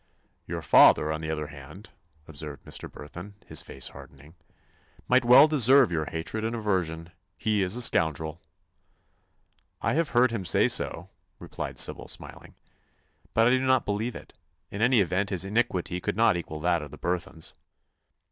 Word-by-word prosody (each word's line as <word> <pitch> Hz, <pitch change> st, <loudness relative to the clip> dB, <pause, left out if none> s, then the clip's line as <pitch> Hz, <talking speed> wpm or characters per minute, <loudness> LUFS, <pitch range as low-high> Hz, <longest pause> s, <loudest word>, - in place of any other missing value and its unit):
"Your -, -, -5 dB
father, 75 Hz, -, +6 dB
on 80 Hz, 0 st, -4 dB
the 80 Hz, -, -5 dB
other 75 Hz, -1 st, -3 dB
hand," 75 Hz, +7 st, -12 dB, 0.4 s
observed 75 Hz, -2 st, -9 dB
Mr. -, -, -6 dB
Burthon, 85 Hz, +7 st, -10 dB
his -, -, -1 dB
face 65 Hz, -, -5 dB
hardening, 70 Hz, +4 st, -15 dB, 0.7 s
"might 130 Hz, +1 st, +3 dB
well 125 Hz, +5 st, +8 dB
deserve 135 Hz, -5 st, +5 dB
your 80 Hz, -2 st, -1 dB
hatred 80 Hz, +8 st, -5 dB
and 115 Hz, +1 st, -2 dB
aversion. 85 Hz, -7 st, -2 dB, 0.3 s
He 105 Hz, -2 st, 0 dB
is 95 Hz, +2 st, +1 dB
a 125 Hz, -, +3 dB
scoundrel." 80 Hz, -3 st, 0 dB, 1.4 s
"I -, -, -1 dB
have 165 Hz, +1 st, 0 dB
heard 125 Hz, 0 st, +3 dB
him 115 Hz, -5 st, -3 dB
say 85 Hz, -, +3 dB
so," -, -, -1 dB, 0.3 s
replied -, -, -7 dB
Sybil, -, -, +1 dB
smiling, -, -, -9 dB, 0.8 s
"but 115 Hz, -, +4 dB
I 120 Hz, -, +4 dB
do 130 Hz, -, +3 dB
not 130 Hz, -1 st, +2 dB
believe 105 Hz, +4 st, -2 dB
it. -, -, -11 dB, 0.4 s
In 100 Hz, -, -5 dB
any 120 Hz, -1 st, +4 dB
event 95 Hz, +2 st, -1 dB
his 95 Hz, -1 st, -1 dB
iniquity 95 Hz, -4 st, -1 dB
could -, -, -3 dB
not 115 Hz, -2 st, +3 dB
equal 80 Hz, -3 st, -6 dB
that 85 Hz, 0 st, +1 dB
of 75 Hz, -, -8 dB
the -, -, -12 dB
Burthons." 85 Hz, -2 st, -4 dB
95 Hz, 165 wpm, -26 LUFS, 80-115 Hz, 1.4 s, well